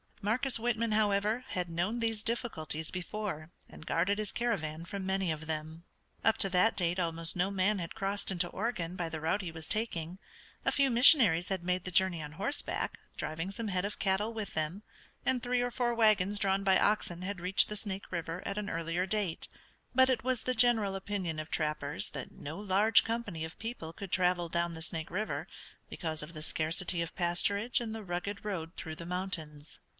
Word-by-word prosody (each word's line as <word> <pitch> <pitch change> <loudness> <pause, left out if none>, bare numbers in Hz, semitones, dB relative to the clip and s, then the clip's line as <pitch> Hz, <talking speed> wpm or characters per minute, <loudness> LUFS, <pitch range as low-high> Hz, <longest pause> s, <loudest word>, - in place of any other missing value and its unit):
Marcus 245 +5 +2
Whitman, 230 -1 0
however, 210 +3 +2
had 180 -2 -2
known 175 +8 -1
these 225 -2 -1
difficulties 160 -10 -2
before, 180 -3 -4 0.2
and 160 - -12
guarded 185 +6 +1
his 210 -2 -2
caravan 165 -9 -2
from 195 +2 -5
many 190 -2 +1
of 155 0 -4
them. 160 +1 -4 0.4
Up 225 - +4
to 195 - +6
that 185 +5 +3
date 175 -1 +1
almost 165 -1 +1
no 180 +2 +1
man 200 +1 +2
had 170 -2 -5
crossed 200 0 0
into 180 -1 0
Oregon 185 -4 -3
by 175 -3 -2
the 160 -1 -4
route 160 +6 0
he 175 -3 -5
was 160 -1 -5
taking. 185 -5 -2 0.4
A - - +2
few 275 -2 +3
missionaries 230 - +7
had 190 -3 -2
made 180 0 0
the 180 - -2
journey 185 -2 +3
on 150 0 -7
horseback, 205 - -2 0.2
driving 165 +4 -3
some 220 +3 -4
head 185 -2 0
of 205 +1 -3
cattle 200 +3 +1
with 215 -3 -5
them, 160 +6 -2 0.4
and 255 -2 +2
three 245 +1 +1
or 245 0 0
four 240 -1 0
wagons 210 -3 +3
drawn 195 0 +2
by 190 -1 +5
oxen 185 -4 +1
had 195 0 -3
reached 185 +2 +5
the 210 - -3
Snake 200 -2 -5
River 170 0 -3
at 200 +1 -2
an 205 -1 -4
earlier 165 +2 -1
date, 200 -4 -1 0.5
but 260 0 +6
it 240 -4 +1
was 255 -2 0
the 255 - 0
general 220 -4 +4
opinion 190 -5 -3
of 155 0 -5
trappers 150 -2 -2
that 140 -4 -6
no 155 +6 -7
large 205 +2 +5
company 225 -8 -3
of 160 +1 -7
people 225 -8 -5
could 195 +1 -8
travel 180 -2 +2
down 170 0 0
the 160 - -8
Snake 160 -1 -3
River 210 +5 -2 0.4
because 160 -3 -3
of 150 +3 -8
the 155 -1 -6
scarcity 170 +3 -1
of 170 - -7
pasturage 200 +6 +1
and 230 -2 -4
the 220 -1 -5
rugged 195 +2 -4
road 170 -4 -3
through 160 -1 -6
the 170 - -8
mountains. 165 -5 -4
190 Hz, 200 wpm, -32 LUFS, 165-215 Hz, 0.5 s, missionaries